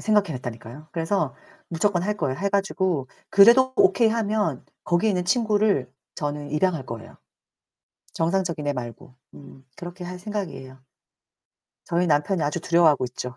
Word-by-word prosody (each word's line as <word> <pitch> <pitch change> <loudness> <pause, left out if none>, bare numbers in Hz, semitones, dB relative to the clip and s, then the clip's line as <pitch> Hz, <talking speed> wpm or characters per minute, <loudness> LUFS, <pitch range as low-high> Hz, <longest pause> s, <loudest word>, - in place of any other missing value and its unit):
생각해 210 -6 +2
냈다니까요. 125 +4 -8
그래서 170 +4 -1 0.3
무조건 175 +1 0
할 210 +2 -1
거예요. 130 -9 -2
해 200 - 0
가지고 190 -8 0 0.2
그래도 240 +6 +6
오케이 220 +4 +4
하면 210 - -1 0.2
거기에 175 +5 +2
있는 180 -2 -1
친구를 210 - +1 0.2
저는 145 -1 -4
입양할 155 -2 0
거예요, 115 -1 -9 1.0
정상적인 170 -2 -1
애 145 - +1
말고. 125 0 -8 0.2
음. 135 -2 -15
그렇게 175 +1 -8
할 180 +1 -6
생각이에요. 160 -11 -6 1.1
저희 175 +1 0
남편이 150 +3 +1
아주 150 +3 -1
두려워하고 165 -6 +3
있죠. 125 0 -7
175 Hz, 345 characters per minute, -24 LUFS, 145-200 Hz, 1.1 s, 그래도